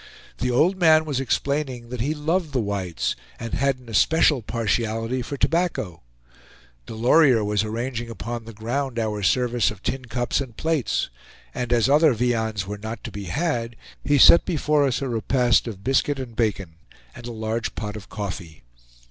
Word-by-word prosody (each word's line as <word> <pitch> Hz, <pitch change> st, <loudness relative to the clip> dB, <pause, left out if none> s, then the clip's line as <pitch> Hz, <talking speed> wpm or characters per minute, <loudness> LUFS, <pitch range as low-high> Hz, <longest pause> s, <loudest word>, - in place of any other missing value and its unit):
The 125 Hz, -, 0 dB
old 160 Hz, +10 st, +3 dB
man 160 Hz, -2 st, +5 dB
was 145 Hz, -4 st, -2 dB
explaining 135 Hz, -2 st, -2 dB
that 125 Hz, -2 st, -4 dB
he 150 Hz, +6 st, -1 dB
loved 160 Hz, +1 st, -1 dB
the 130 Hz, -, +1 dB
whites, 100 Hz, -6 st, -2 dB, 0.2 s
and 115 Hz, -, -6 dB
had 140 Hz, 0 st, +1 dB
an 125 Hz, -1 st, -18 dB
especial 135 Hz, -, +3 dB
partiality 115 Hz, +2 st, -1 dB
for 125 Hz, +4 st, -5 dB
tobacco. 165 Hz, -, -1 dB, 0.9 s
Delorier 120 Hz, +1 st, +4 dB
was 105 Hz, 0 st, 0 dB
arranging 120 Hz, +2 st, -4 dB
upon 115 Hz, 0 st, -6 dB
the 115 Hz, -, -8 dB
ground 120 Hz, +4 st, -3 dB
our 110 Hz, -2 st, -1 dB
service 120 Hz, +2 st, +2 dB
of 105 Hz, -2 st, -10 dB
tin 130 Hz, -1 st, -3 dB
cups 120 Hz, +2 st, -1 dB
and 120 Hz, -5 st, -8 dB
plates; 160 Hz, -, -1 dB, 0.4 s
and 125 Hz, -1 st, -4 dB
as 120 Hz, -1 st, +3 dB
other 150 Hz, -1 st, +5 dB
viands 110 Hz, -4 st, 0 dB
were 105 Hz, +1 st, -6 dB
not 110 Hz, 0 st, -6 dB
to -, -, -6 dB
be 100 Hz, -1 st, -7 dB
had, 120 Hz, -, -2 dB, 0.3 s
he 145 Hz, 0 st, +3 dB
set 170 Hz, +5 st, +8 dB
before 150 Hz, -4 st, +1 dB
us 135 Hz, +1 st, -1 dB
a -, -, -2 dB
repast 120 Hz, +1 st, +2 dB
of 100 Hz, -4 st, -7 dB
biscuit 135 Hz, +3 st, +1 dB
and 125 Hz, -4 st, -7 dB
bacon, 100 Hz, -8 st, -1 dB, 0.4 s
and 120 Hz, -, -10 dB
a -, -, -5 dB
large 110 Hz, 0 st, -3 dB
pot 105 Hz, -1 st, -5 dB
of 105 Hz, -3 st, -9 dB
coffee. 95 Hz, -6 st, -6 dB
120 Hz, 175 wpm, -23 LUFS, 110-140 Hz, 0.9 s, set